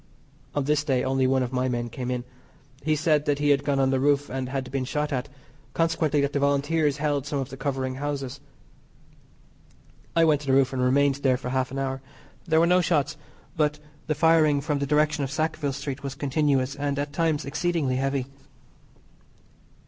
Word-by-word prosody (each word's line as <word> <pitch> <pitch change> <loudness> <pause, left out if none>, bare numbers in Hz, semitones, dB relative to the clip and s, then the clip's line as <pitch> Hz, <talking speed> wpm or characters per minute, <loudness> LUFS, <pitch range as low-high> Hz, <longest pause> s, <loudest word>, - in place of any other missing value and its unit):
On 145 - +1
this 145 +1 +1
day 135 -4 +1
only 130 0 +1
one 130 0 +2
of 125 +1 -5
my 130 0 0
men 120 -1 -2
came 125 +2 -5
in. 125 -1 -2 0.6
He 155 +1 +1
said 150 -1 +2
that 145 -1 +1
he 145 0 +1
had 140 0 +2
gone 140 -1 0
on 135 0 +3
the 135 - +1
roof 145 +1 +1
and 130 -1 -3
had 130 -1 -4
been 135 -1 -1
shot 150 +3 -2
at, 130 +2 -2 0.5
consequently 160 -3 +1
that 140 +1 -1
the 145 - +1
Volunteers 145 +1 +1
held 145 -2 -1
some 145 -1 -2
of 135 -1 -3
the 135 - -8
covering 135 -2 -2
houses. 140 -2 -3 1.8
I 165 0 +5
went 150 -2 +3
to 145 - -9
the 135 - +3
roof 135 0 +3
and 130 - -1
remained 135 +2 +3
there 130 -2 +2
for 125 -1 -6
half 130 0 0
an 135 - -6
hour. 135 -1 -2 0.5
There 160 -1 +4
were 165 - +5
no 180 +1 +4
shots, 155 -4 +1 0.4
but 150 -2 +1 0.3
the 155 - 0
firing 155 -1 +4
from 145 0 -1
the 140 - -1
direction 150 0 +2
of 135 - -2
Sackville 155 0 -1
Street 135 0 -5
was 135 -1 -5
continuous 140 -2 +1
and 145 -1 -2
at 145 0 -3
times 160 -1 0
exceedingly 150 -3 0
heavy. 135 -1 -1
140 Hz, 200 wpm, -25 LUFS, 135-150 Hz, 1.8 s, I